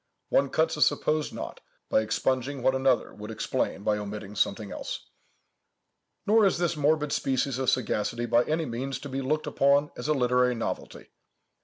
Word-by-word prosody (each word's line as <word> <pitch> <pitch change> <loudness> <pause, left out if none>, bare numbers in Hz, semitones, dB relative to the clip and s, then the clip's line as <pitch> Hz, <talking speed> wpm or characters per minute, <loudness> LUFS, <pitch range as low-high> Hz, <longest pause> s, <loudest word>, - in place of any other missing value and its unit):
One 140 0 +3
cuts 160 +3 +1
a - - -4
supposed 155 0 +2
knot - - -7 0.3
by - - +3
expunging 130 +4 -1
what 130 - +4
another 130 -1 +1
would 105 +1 -9
explain 110 -2 -2
by 105 0 +1
omitting 105 0 -6
something 100 +1 0
else. - - -5 1.2
Nor 215 +2 +5
is 190 - +1
this 170 -1 0
morbid 150 0 +1
species 135 -1 0
of 130 - +2
sagacity 120 -1 0
by 120 +1 +3
any 160 +1 0
means 130 +1 -3
to 145 - -7
be 135 +1 -3
looked 150 +4 -1
upon 140 +1 +3
as - - -5
a 155 - +2
literary 125 -1 +2
novelty. 115 - -5
130 Hz, 170 wpm, -27 LUFS, 115-150 Hz, 1.2 s, Nor